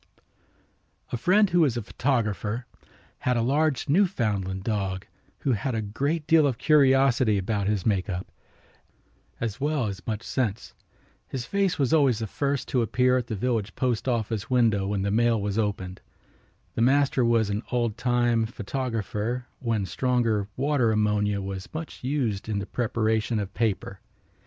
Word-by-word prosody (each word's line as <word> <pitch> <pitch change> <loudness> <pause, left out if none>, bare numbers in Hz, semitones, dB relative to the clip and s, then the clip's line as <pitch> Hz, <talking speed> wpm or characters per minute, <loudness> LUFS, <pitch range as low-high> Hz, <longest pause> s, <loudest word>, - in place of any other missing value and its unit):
A - - -1
friend 185 - +3
who 175 - +3
was 140 -8 +3
a 120 - -3
photographer 115 -2 -1 0.5
had 125 -1 +1
a 115 - +1
large 145 +3 +1
Newfoundland 110 - +1
dog 95 -4 -2 0.4
who 135 - +1
had 125 +2 -1
a 110 - 0
great 140 +10 -2
deal 160 -2 +5
of 130 -4 -1
curiosity 135 -6 +4
about 100 +1 -1
his 105 -3 0
make 100 -4 +1
up, 90 0 -3 1.1
as 115 +2 -3
well 145 -3 +1
as 100 -2 -4
much 110 -1 -2
sense. 115 -5 -2 0.5
His 125 -3 -4
face 200 +1 0
was 140 0 +1
always 140 -7 +4
the 110 - -3
first 140 +5 -2
to 125 - +2
appear 125 +2 +2
at 125 -2 -1
the 110 - -3
village 110 -1 -1
postoffice 115 -3 -1
window 115 -6 +2
when 100 -1 -1
the 100 - 0
mail 115 +1 +3
was 100 +1 -1
opened. 95 -3 -3 0.7
The - - -2
master 135 +1 +3
was 115 -3 +2
an 105 +2 -1
oldtime 120 -1 +1
photographer 115 0 -3
when 115 -5 -1
stronger 115 0 0
water 135 -4 +2
ammonia 105 -1 +1
was 95 -1 -6
much 160 -4 -6
used 125 -7 -1
in 105 - -1
the 100 - -2
preparation 110 0 0
of 100 -2 -3
paper. 100 -4 -1
115 Hz, 155 wpm, -26 LUFS, 105-130 Hz, 1.1 s, deal